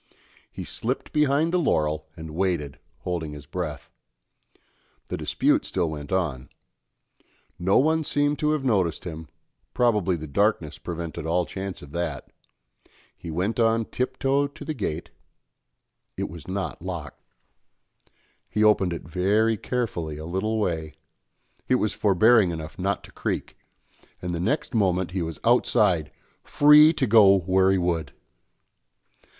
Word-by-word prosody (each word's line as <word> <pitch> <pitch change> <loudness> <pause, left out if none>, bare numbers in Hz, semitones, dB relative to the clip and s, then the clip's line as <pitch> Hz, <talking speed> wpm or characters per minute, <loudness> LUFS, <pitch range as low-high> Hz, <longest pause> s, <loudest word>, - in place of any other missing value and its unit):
He - - -7
slipped - - -4
behind 150 +3 +2
the 180 - +3
laurel 80 - 0
and 80 -1 -8
waited, 85 -6 -1 0.2
holding 80 -4 -3
his 75 -1 -10
breath; 80 -1 -5 1.2
the - - -2
dispute - - +1
still 85 -4 -1
went 75 -2 -7
on; 80 -9 -1 1.1
no 95 +3 +3
one 160 +3 +3
seemed 145 0 0
to 150 - +1
have 145 -3 -2
noticed 95 -9 +1
him, 80 -2 -7 0.5
probably 105 -7 +2
the 80 -2 -6
darkness 85 0 0
prevented 85 -2 -5
all 90 +1 +1
chance 95 -2 -6
of 70 - -12
that; 80 -4 -4 0.8
he - - -9
went 95 +8 -2
on 115 0 +3
tip 130 +3 -3
toe 140 +2 +2
to 145 +2 -11
the 155 - -2
gate 85 - -4 1.1
it - - -2
was 80 -4 -10
not 95 -9 -4
locked. - - -6 1.3
He 105 - +1
opened 100 -4 +4
it 85 - -6
very 100 +7 +1
carefully 95 -10 -3
a 80 - -7
little 95 +6 -1
way; 80 -6 -2 0.7
it 130 - +3
was 110 -4 0
forbearing 105 +1 +4
enough 80 -1 -6
not 100 +2 -1
to - - -14
creak, - - -4 0.6
and 90 0 -4
the 85 - -2
next 135 - -1
moment 95 -5 +1
he 95 0 -2
was 80 -1 -5
outside, 105 -8 +3 0.3
free 150 +2 +7
to 140 - 0
go 100 -4 +6
where 95 +2 +3
he 95 - +3
would! 85 -4 -1
95 Hz, 145 wpm, -25 LUFS, 80-115 Hz, 1.3 s, free